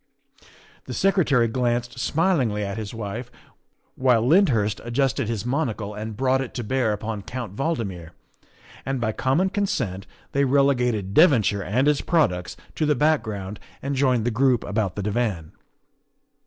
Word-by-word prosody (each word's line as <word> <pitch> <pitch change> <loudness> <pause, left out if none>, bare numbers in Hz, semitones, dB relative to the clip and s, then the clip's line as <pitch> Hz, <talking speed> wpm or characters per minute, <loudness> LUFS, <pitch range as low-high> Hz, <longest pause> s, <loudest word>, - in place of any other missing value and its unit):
The - - -6
Secretary 165 -11 +3
glanced 120 +1 -1
smilingly 135 - +1
at 100 +2 -4
his 105 -2 -5
wife, 115 +2 -5 0.7
while 125 -3 +3
Lyndhurst 125 - +3
adjusted 120 -1 0
his 115 -2 -3
monocle 120 -6 -2
and 105 0 -6
brought 130 +1 +2
it 130 - -6
to 120 - -3
bear 125 0 0
upon 105 0 -4
Count 120 -2 -6
Valdmir; 105 - -3 0.7
and 135 -1 -2
by 115 -2 0
common 135 - +1
consent 120 - -2 0.2
they 140 - +2
relegated 125 -7 +2
Devonshire 120 - +4
and 125 +8 +1
its 150 -2 +3
products 90 - 0 0.2
to 155 - -1
the 150 - +3
background 110 -9 0 0.2
and 140 +1 -2
joined 130 -4 +2
the 120 - +1
group 125 +1 +2
about 100 -2 -2
the 105 - -3
divan. 105 -7 -2
120 Hz, 145 wpm, -24 LUFS, 105-135 Hz, 0.7 s, Devonshire